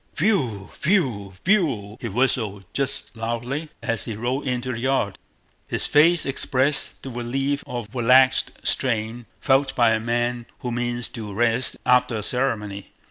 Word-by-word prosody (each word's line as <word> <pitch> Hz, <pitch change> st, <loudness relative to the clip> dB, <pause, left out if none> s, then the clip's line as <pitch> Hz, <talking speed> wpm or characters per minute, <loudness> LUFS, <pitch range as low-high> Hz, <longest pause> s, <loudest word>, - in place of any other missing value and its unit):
"Whew... 130 Hz, -, 0 dB
whew... 130 Hz, -, +1 dB
whew!" 135 Hz, -, +1 dB
he 120 Hz, -, -3 dB
whistled 110 Hz, -3 st, 0 dB
just 140 Hz, -3 st, 0 dB
audibly 120 Hz, +7 st, -3 dB
as 115 Hz, -4 st, -1 dB
he 115 Hz, -, -4 dB
rode 125 Hz, +6 st, -2 dB
into 125 Hz, 0 st, -2 dB
the 115 Hz, -, -5 dB
yard. 130 Hz, -6 st, 0 dB, 0.5 s
His -, -, 0 dB
face 160 Hz, +3 st, +4 dB
expressed 135 Hz, +1 st, 0 dB
the 135 Hz, -, -6 dB
relief 135 Hz, +4 st, -2 dB
of 120 Hz, -4 st, -6 dB
relaxed 130 Hz, +2 st, +4 dB
strain 115 Hz, -1 st, 0 dB
felt 135 Hz, 0 st, +2 dB
by 120 Hz, -3 st, +4 dB
a 110 Hz, -, +2 dB
man 120 Hz, +1 st, -1 dB
who 125 Hz, -, -3 dB
means 120 Hz, 0 st, -1 dB
to 110 Hz, -5 st, -7 dB
rest 115 Hz, +4 st, +2 dB
after 125 Hz, -1 st, +3 dB
a 105 Hz, -, -3 dB
ceremony. 105 Hz, -6 st, -1 dB
120 Hz, 145 wpm, -23 LUFS, 115-135 Hz, 0.5 s, face